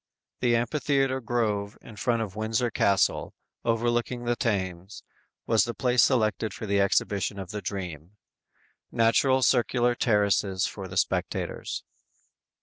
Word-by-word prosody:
The 120 Hz, -1 st, +2 dB
amphitheater 135 Hz, +2 st, 0 dB
grove 110 Hz, -3 st, -1 dB
in 110 Hz, -, -13 dB
front 115 Hz, +1 st, 0 dB
of 100 Hz, -3 st, -8 dB
Windsor 110 Hz, +3 st, -1 dB
Castle, 100 Hz, -1 st, +1 dB, 0.3 s
overlooking 120 Hz, +1 st, 0 dB
the 120 Hz, 0 st, 0 dB
Thames, 95 Hz, -5 st, -3 dB, 0.4 s
was 115 Hz, -1 st, +3 dB
the 120 Hz, -, -4 dB
place 125 Hz, -1 st, +3 dB
selected 110 Hz, -4 st, +1 dB
for -, -, -6 dB
the 100 Hz, -1 st, +2 dB
exhibition 100 Hz, +1 st, 0 dB
of 95 Hz, -1 st, -6 dB
the 105 Hz, -1 st, -5 dB
"Dream." 90 Hz, -4 st, -6 dB, 0.8 s
Natural 130 Hz, +3 st, +3 dB
circular 120 Hz, -1 st, +3 dB
terraces 100 Hz, -5 st, +1 dB
for 95 Hz, -2 st, -6 dB
the 95 Hz, +1 st, -7 dB
spectators. -, -, -2 dB
110 Hz, 130 wpm, -27 LUFS, 100-120 Hz, 0.8 s, was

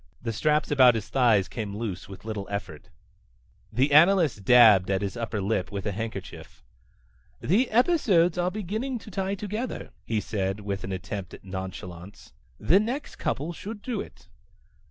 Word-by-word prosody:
The 115 Hz, -1 st, -4 dB
straps 150 Hz, +7 st, +1 dB
about 130 Hz, -4 st, +6 dB
his 110 Hz, -2 st, -4 dB
thighs 115 Hz, -7 st, +3 dB
came 105 Hz, -4 st, -5 dB
loose 100 Hz, -5 st, -5 dB
with 95 Hz, +1 st, -11 dB
little 105 Hz, -3 st, -4 dB
effort. 100 Hz, -7 st, -6 dB, 0.8 s
The 130 Hz, +6 st, +1 dB
analyst 160 Hz, -, +5 dB
dabbed 110 Hz, -5 st, +7 dB
at 95 Hz, 0 st, 0 dB
his 100 Hz, -, -3 dB
upper 115 Hz, -3 st, -3 dB
lip 100 Hz, -1 st, -1 dB
with 100 Hz, -2 st, -5 dB
a 105 Hz, -, 0 dB
handkerchief. 110 Hz, +3 st, -7 dB, 0.8 s
"The 225 Hz, -, +2 dB
episodes 215 Hz, -, +3 dB
are 180 Hz, 0 st, 0 dB
beginning 215 Hz, +7 st, -3 dB
to 215 Hz, -1 st, -12 dB
tie 195 Hz, +1 st, -2 dB
together," 210 Hz, +5 st, -5 dB
he 110 Hz, -2 st, -1 dB
said, 95 Hz, -1 st, -3 dB
with 100 Hz, -1 st, -4 dB
an 95 Hz, -, -5 dB
attempt 95 Hz, 0 st, -5 dB
at -, -, -16 dB
nonchalance. 95 Hz, -1 st, -8 dB, 0.3 s
"The 160 Hz, -, +4 dB
next 250 Hz, +7 st, -4 dB
couple 155 Hz, +5 st, -2 dB
should 205 Hz, +4 st, -8 dB
do 245 Hz, +1 st, -2 dB
it." -, -, -13 dB
115 Hz, 160 wpm, -26 LUFS, -, 0.8 s, dabbed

